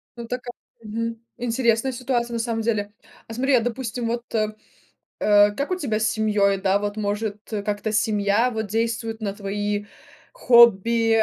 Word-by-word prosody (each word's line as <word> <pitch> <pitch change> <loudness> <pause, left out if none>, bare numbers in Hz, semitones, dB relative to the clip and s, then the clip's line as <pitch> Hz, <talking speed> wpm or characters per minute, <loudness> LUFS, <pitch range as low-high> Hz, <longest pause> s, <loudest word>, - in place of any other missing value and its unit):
Ну 235 -1 -7
така 250 0 -5 0.3
Мгм. 230 +2 -3 0.3
Интересная 235 +1 +1
ситуация 240 -1 -2
на 230 - -1
самом 225 -1 -1
деле. 210 -2 -1 0.3
А 225 - -8
смотри, 265 +3 +2
а - - +5
допустим, 240 0 -3
вот 235 +1 -2
э, 215 -1 0 0.7
э, 205 0 +5
как 280 - -3
у - - +2
тебя 250 -12 -2
с 220 - +2
семьей? 210 -3 +2
Да, 195 0 +2
вот 205 0 -3
может, 210 0 -2 0.2
э, 210 -2 -2
как-то 210 +1 -2
семья 210 +1 +2
вот 220 -2 -3
действует 225 +1 -2
на 200 -2 -2
твои 205 +1 -3 0.5
хобби, 230 - +5
225 Hz, 165 wpm, -23 LUFS, 205-235 Hz, 0.7 s, а